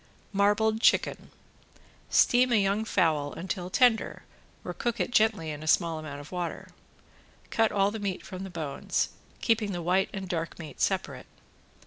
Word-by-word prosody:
~MARBLED 210 +2 +2
CHICKEN~ - - +2 0.8
Steam 250 +1 +4
a - - +4
young 205 +1 +2
fowl 155 -8 +1
until 180 0 -4
tender 240 +2 +2 0.4
or - - -4
cook 240 -2 -2
it - - -1
gently 215 -9 +2
in 150 0 -7
a 155 - -7
small 165 0 +2
amount 150 -2 -7
of 145 +1 -11
water. 175 -2 -4 0.8
Cut 225 -1 +2
all 200 0 +2
the 220 - -5
meat 200 -3 -3
from 190 -1 -7
the 195 - -6
bones, 155 -6 -2 0.3
keeping 220 -3 +1
the 175 - -3
white 185 +3 +2
and 190 -2 -5
dark 165 -2 -3
meat 160 -3 -9
separate. - - -1
190 Hz, 160 wpm, -28 LUFS, 165-220 Hz, 0.8 s, Steam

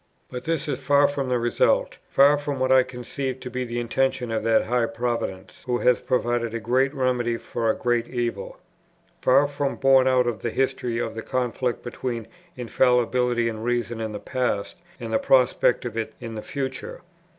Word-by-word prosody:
But 125 -1 -6
this 165 -2 -1
is 140 -3 -2
far 145 0 +4
from 140 -2 -3
the 125 - +2
result, 120 0 +1
far 140 +2 +6
from 145 -1 -3
what 130 0 +1
I 130 0 +7
conceive 130 +1 -5
to 125 -1 -7
be 130 +1 -2
the 120 -1 -4
intention 125 0 -1
of 110 - 0
that 115 0 +2
high 120 0 +1
Providence 115 -5 -4
who 125 -1 +1
has 125 0 +3
provided 120 -2 -1
a - - -2
great 130 +4 +1
remedy 125 -4 0
for 115 0 -2
a - - +2
great 120 -1 0
evil, 120 -5 -3 0.6
far 135 +3 +4
from 140 -1 -2
borne 135 -1 +4
out 130 -1 +3
by 120 - +2
the 110 +1 -4
history 130 -1 -1
of 120 - -2
the 115 - -5
conflict 125 0 -2
between 120 -2 -4 0.3
Infallibility 125 -1 +2
and 110 -1 -4
Reason 120 -1 -1
in 110 -1 -3
the 105 - -5
past, 125 -5 -2 0.2
and 115 -2 -5
the - - +3
prospect 125 -1 +3
of 120 -2 -5
it 110 -1 -3
in 115 - -7
the 110 - -5
future. 130 0 -5
125 Hz, 190 wpm, -24 LUFS, 115-130 Hz, 0.6 s, I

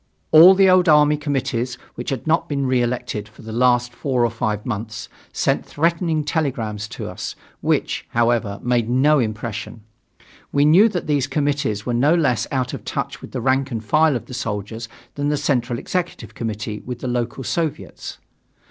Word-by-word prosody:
All 170 +5 +9
the 195 0 +5
old 185 -1 +5
army 150 0 +6
committees 130 -4 -2 0.2
which 120 - -5
had 135 -3 -3
not 165 +1 +1
been 140 -2 -1
reelected 120 -4 -1
for 105 - -16
the 110 - -7
last 125 +1 +2
four 125 -2 0
or 115 - 0
five 110 -2 -2
months, 110 -2 -4 0.2
sent - - 0
threatening 165 0 0
telegrams 120 -9 -2
to - - -7
us, - - -6 0.2
which, - - -1
however, 115 -3 +1
made 120 -2 +1
no 140 +4 +4
impression. 110 -1 -4 0.7
We 145 0 +3
knew 185 +9 +6
that 180 -5 -3
these 145 -4 +1
committees 140 -8 -1
were 125 - -1
no 140 +8 +3
less 125 - +1
out 130 -2 -1
of - - -6
touch - - -4
with - - -10
the 125 - -4
rank 135 +2 +1
and 115 -4 -5
file 155 +5 +3
of 120 - -4
the - - -10
soldiers 115 -1 -4 0.2
than 145 0 -1
the 150 - +1
Central 120 -4 0
Executive 170 - -4
Committee 105 -1 -4
with 125 -1 -6
the - - -3
local 120 +1 -2
Soviets. 160 +2 -4
125 Hz, 175 wpm, -21 LUFS, 115-150 Hz, 0.7 s, All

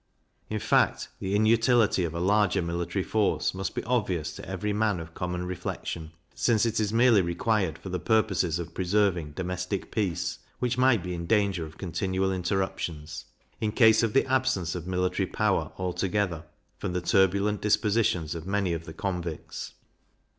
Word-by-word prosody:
In 110 - -1
fact, - - +2
the 95 +1 -1
inutility 110 -1 +4
of 85 0 -5
a - - -2
larger 100 0 +2
military 85 +2 -2
force 110 +1 +1
must 95 +1 -4
be - - -2
obvious 90 -9 -1
to - - -9
every 95 +2 -2
man 105 -3 +1
of 80 0 -9
common 90 0 -3
reflection, 85 -2 -5 0.2
since 115 -2 +2
it 115 -1 0
is 105 -1 0
merely 115 -2 +5
required 90 0 0
for 85 +3 -9
the 90 0 -2
purposes 95 -4 +1
of 85 -1 -6
preserving 90 -5 +1
domestic 90 +2 -3
peace, 90 -6 -1 0.2
which 125 -1 0
might 125 -5 +3
be 90 -1 -4
in 85 -1 -5
danger 100 -6 +1
of 80 +1 -15
continual 95 +1 -1
interruptions, 85 -5 -3 0.3
in 110 -1 0
case 110 -1 +5
of 115 -2 0
the 135 - +4
absence 130 -10 +1
of 90 -1 -6
military 90 +1 0
power 95 -7 0
altogether, 90 -2 -1 0.3
from 95 - -3
the 90 - -1
turbulent 100 +3 +2
dispositions 105 -6 +1
of 85 +1 -7
many 100 -3 0
of 80 0 -4
the 80 - -8
convicts. 85 -2 -5
95 Hz, 165 wpm, -27 LUFS, 85-105 Hz, 0.3 s, merely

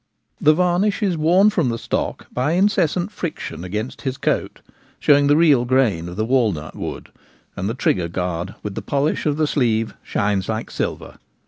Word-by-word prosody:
The 155 +1 +5
varnish 180 +5 +1
is 190 -4 +1
worn 180 +7 +4
from 170 -11 +1
the 115 - -2
stock - - -3
by 130 +6 0
incessant 185 -1 +1
friction 160 - -5
against 105 +7 -4
his 130 -1 -3
coat, - - -2 0.4
showing 145 -1 +4
the 145 +1 +4
real 150 -7 +5
grain 120 -10 +1
of 90 - -8
the 110 +2 -1
walnut 110 - 0
wood, - - -6 0.5
and 95 +2 -2
the 115 - -3
trigger 90 -8 +1
guard 85 -1 -3
with 105 - -4
the - - -5
polish 145 +3 0
of 145 -1 0
the 155 - +2
sleeve 115 -7 0
shines 100 -2 -1
like 110 0 -3
silver. - - -4
130 Hz, 180 wpm, -21 LUFS, 105-160 Hz, 0.5 s, The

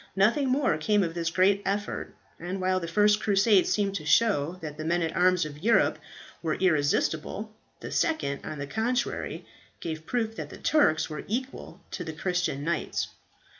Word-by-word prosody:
Nothing 235 +8 +3
more 255 - +2
came 205 +4 +2
of 165 -2 -2
this 165 -1 -1
great 190 +3 +3
effort, 205 +1 -3 0.2
and 180 +3 -4
while 185 0 +1
the 170 - -5
first 210 +4 +3
Crusade 200 -1 +4
seemed 200 -2 +1
to 155 - -8
show 180 -6 +3
that 155 -4 -6
the 155 - -6
men 170 +2 +1
at 165 - -2
arms 180 -2 +3
of 150 -1 -8
Europe 225 +7 +3 0.4
were 160 -2 -1
irresistible, 160 +5 0 0.3
the - - -7
second 230 - 0
on 155 - -6
the 140 - -4
contrary 225 - -2 0.3
gave 160 -1 -5
proof 225 -2 -1
that - - -5
the - - -10
Turks 160 - +3
were 150 -1 -6
equal 255 +5 -5
to - - -4
the 160 -1 -6
Christian 175 -3 -1
knights. 165 0 -1
185 Hz, 175 wpm, -27 LUFS, 160-210 Hz, 0.4 s, Crusade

